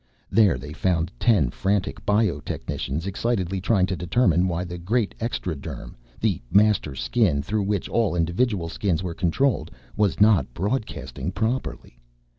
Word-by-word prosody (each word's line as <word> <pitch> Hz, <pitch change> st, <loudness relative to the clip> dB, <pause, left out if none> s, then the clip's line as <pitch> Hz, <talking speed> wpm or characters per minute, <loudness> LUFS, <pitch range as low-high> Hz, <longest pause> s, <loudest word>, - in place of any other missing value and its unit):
There 100 Hz, -, +4 dB
they 75 Hz, +4 st, -8 dB
found 85 Hz, 0 st, 0 dB
ten 100 Hz, -, +3 dB
frantic 95 Hz, +3 st, -1 dB
bio 105 Hz, -7 st, +2 dB
technicians 75 Hz, +2 st, -4 dB
excitedly 95 Hz, -2 st, -1 dB
trying 95 Hz, -1 st, +3 dB
to 95 Hz, 0 st, -2 dB
determine 90 Hz, 0 st, +2 dB
why 85 Hz, 0 st, -1 dB
the 90 Hz, -1 st, -6 dB
great 105 Hz, +5 st, 0 dB
extraderm 90 Hz, -, -4 dB, 0.3 s
the 105 Hz, -9 st, 0 dB
Master 100 Hz, -8 st, +3 dB
Skin 85 Hz, -, +1 dB
through 105 Hz, +6 st, -1 dB
which 100 Hz, -1 st, -1 dB
all 110 Hz, -7 st, +1 dB
individual 85 Hz, +3 st, 0 dB
Skins 90 Hz, 0 st, -1 dB
were 90 Hz, -2 st, -3 dB
controlled 100 Hz, +10 st, 0 dB, 0.3 s
was 105 Hz, -3 st, +1 dB
not 100 Hz, -, +4 dB
broadcasting 105 Hz, +7 st, -3 dB
properly. 110 Hz, -, -3 dB
95 Hz, 140 wpm, -24 LUFS, 85-110 Hz, 0.3 s, There